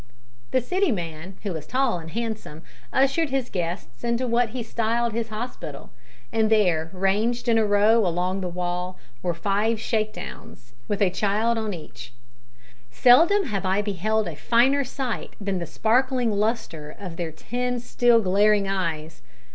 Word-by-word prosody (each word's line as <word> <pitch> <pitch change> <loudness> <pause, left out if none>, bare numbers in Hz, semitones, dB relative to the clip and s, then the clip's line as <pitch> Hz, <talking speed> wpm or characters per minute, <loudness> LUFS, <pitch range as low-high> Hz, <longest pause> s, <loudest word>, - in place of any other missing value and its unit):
The 255 - +2
City 370 - +1
man, 170 -1 -5
who 200 -4 -2
was 160 -3 -6
tall 255 -7 +1
and 165 0 -9
handsome, 220 -7 -5 0.3
ushered 275 +4 +2
his 265 -2 -2
guests 170 - -4
into 235 +2 0
what 235 0 +2
he 240 +1 -4
styled 230 +1 0
his 230 0 -2
hospital, 215 - -6 0.4
and 220 -1 +2
there, 180 -7 +3
ranged 210 +6 0
in 230 -1 +4
a 220 - +3
row 210 +3 +4
along 180 +3 -1
the 180 - -2
wall, 180 +1 -3 0.2
were 175 -1 -1
five 205 +5 0
shakedowns, 215 - -4
with 205 0 +1
a 185 - +3
child 215 +4 +1
on 220 -1 -2
each. 130 -7 -10 0.8
Seldom 320 - +5
have 210 - -3
I 190 +2 +1
beheld 210 +1 0
a 165 - -5
finer 255 - +3
sight 255 -2 -4
than 195 -2 -2
the 170 - -4
sparkling 245 - +2
lustre 205 -8 -1
of 180 -5 -7
their 165 -1 -3
ten 245 +9 -3
still 240 -1 +3
glaring 200 +2 +3
eyes! 165 -5 -3
210 Hz, 155 wpm, -24 LUFS, 180-235 Hz, 0.8 s, Seldom